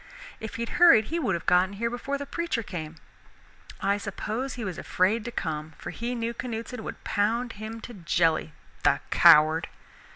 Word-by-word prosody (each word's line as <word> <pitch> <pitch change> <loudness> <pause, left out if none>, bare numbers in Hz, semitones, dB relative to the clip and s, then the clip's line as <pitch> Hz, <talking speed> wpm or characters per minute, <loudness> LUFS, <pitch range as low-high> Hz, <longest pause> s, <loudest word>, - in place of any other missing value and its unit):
If 220 -2 -7
he'd 235 +1 -3
hurried 330 -12 +8
he 340 - +1
would 195 - 0
have 170 - -6
gotten 185 +2 +3
here 230 +3 -2
before 275 +3 -3
the 285 - -5
preacher 335 -5 -2
came. 165 -6 -6 0.9
I 200 +1 +1
suppose 220 +6 -4
he 235 -3 -5
was 185 -3 -4
afraid 205 +5 +1
to 240 - -4
come, 155 -5 -4
for - - -7
he 240 +2 -4
knew 230 0 -2
Canuteson 235 0 -5
could - - -7
pound 225 +4 0
him 215 +2 -7
to 240 - -9
jelly, 165 -4 +1 0.3
the - - +4
coward!" 155 +2 +6
220 Hz, 175 wpm, -27 LUFS, 180-240 Hz, 0.9 s, hurried